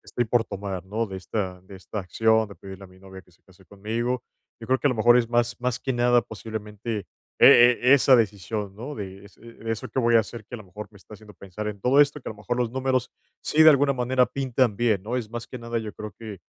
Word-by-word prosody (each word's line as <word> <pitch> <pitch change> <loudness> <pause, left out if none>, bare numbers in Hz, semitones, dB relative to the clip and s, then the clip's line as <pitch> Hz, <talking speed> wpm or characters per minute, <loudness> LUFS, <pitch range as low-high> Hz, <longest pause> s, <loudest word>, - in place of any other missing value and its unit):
estoy 120 - -2
por 115 +1 +1
tomar, 95 -2 -6
¿no? 110 +4 -2
De 95 - -7
esta 95 -1 -4
de 95 +1 -13
esta 95 +3 -7
acción 110 +4 +1
de 100 - -11
pedirle 95 0 -11
a - - -11
mi 95 0 -19
novia 95 0 -12
que 90 - -26
se 85 - -30
case 95 0 -22
conmigo. 115 +5 -3 0.4
Yo 115 - -9
creo 130 - +2
que - - -1
a - - +4
lo - - -1
mejor 120 +2 +5
es 115 - 0
más 120 0 0
más 125 0 -1
que 130 - -2
nada 120 0 +3
posiblemente 105 -1 -6 0.3
e - - +9 0.3
e 125 +2 +5
esa 135 -1 +5
decisión, 105 -2 -2
¿no? 130 +7 -7
De 100 -1 -8
es 100 - -17
eh 115 0 -14
eso 115 -1 -3
que - - -4
voy 120 -2 +2
a 115 - +7
hacer 110 +1 -9
que 125 - -10
a - - -5
lo 105 - -12
mejor 105 +3 -9
me - - -16
está 100 - -18
haciendo 105 0 -15
pensar 100 +3 -8
en 105 -1 -5
todo 130 +5 +4
esto, 145 +1 +2
que - - -6
a - - -5
lo - - -19
mejor 105 +4 -4
los 120 -2 -1
números, 130 0 -1 0.3
si 155 +1 +3
de 155 - +9
alguna 140 -1 +3
manera 125 0 +1
pintan 125 -3 0
bien, 110 -5 +1
¿no? 115 +5 -3
Es 120 -4 -4
más 120 0 -6
que 125 - -8
nada 115 0 -3
yo 110 -2 -6
creo 105 -2 -8
que, 110 -5 -9
110 Hz, 270 wpm, -24 LUFS, 100-120 Hz, 0.4 s, e